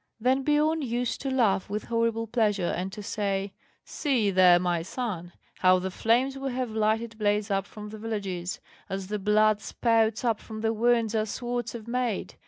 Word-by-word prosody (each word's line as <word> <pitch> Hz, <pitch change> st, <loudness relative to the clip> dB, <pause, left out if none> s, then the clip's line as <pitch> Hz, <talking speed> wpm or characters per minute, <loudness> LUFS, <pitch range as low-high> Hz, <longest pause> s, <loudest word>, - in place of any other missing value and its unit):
Then 255 Hz, +4 st, +2 dB
Biorn 305 Hz, +2 st, +2 dB
used 245 Hz, -2 st, -2 dB
to 270 Hz, -, -2 dB
laugh 215 Hz, -8 st, +2 dB
with 210 Hz, +1 st, -3 dB
horrible 230 Hz, -1 st, 0 dB
pleasure, 210 Hz, -5 st, +1 dB
and 185 Hz, +2 st, -3 dB
to 210 Hz, +1 st, -8 dB
say: 200 Hz, -1 st, -2 dB, 0.3 s
"See 245 Hz, -9 st, 0 dB
there, 180 Hz, -2 st, +6 dB
my 175 Hz, -1 st, 0 dB
son, 180 Hz, -3 st, -4 dB, 0.3 s
how 185 Hz, 0 st, +5 dB
the 185 Hz, +1 st, -3 dB
flames 250 Hz, +7 st, +1 dB
we 270 Hz, -1 st, -3 dB
have 250 Hz, -2 st, -2 dB
lighted 220 Hz, +1 st, 0 dB
blaze 205 Hz, 0 st, +1 dB
up 195 Hz, 0 st, 0 dB
from 210 Hz, -1 st, -9 dB
the 215 Hz, 0 st, -9 dB
villages, 195 Hz, -5 st, -4 dB, 0.3 s
as 195 Hz, 0 st, -4 dB
the 210 Hz, 0 st, -2 dB
blood 210 Hz, +1 st, +3 dB
spouts 225 Hz, +1 st, +1 dB
up 230 Hz, -3 st, +1 dB
from 220 Hz, -1 st, -8 dB
the 225 Hz, 0 st, +1 dB
wounds 230 Hz, 0 st, +2 dB
our 215 Hz, -1 st, 0 dB
swords 240 Hz, +2 st, -3 dB
have 230 Hz, -2 st, -8 dB
made! 245 Hz, -3 st, -2 dB
220 Hz, 185 wpm, -27 LUFS, 200-240 Hz, 0.3 s, there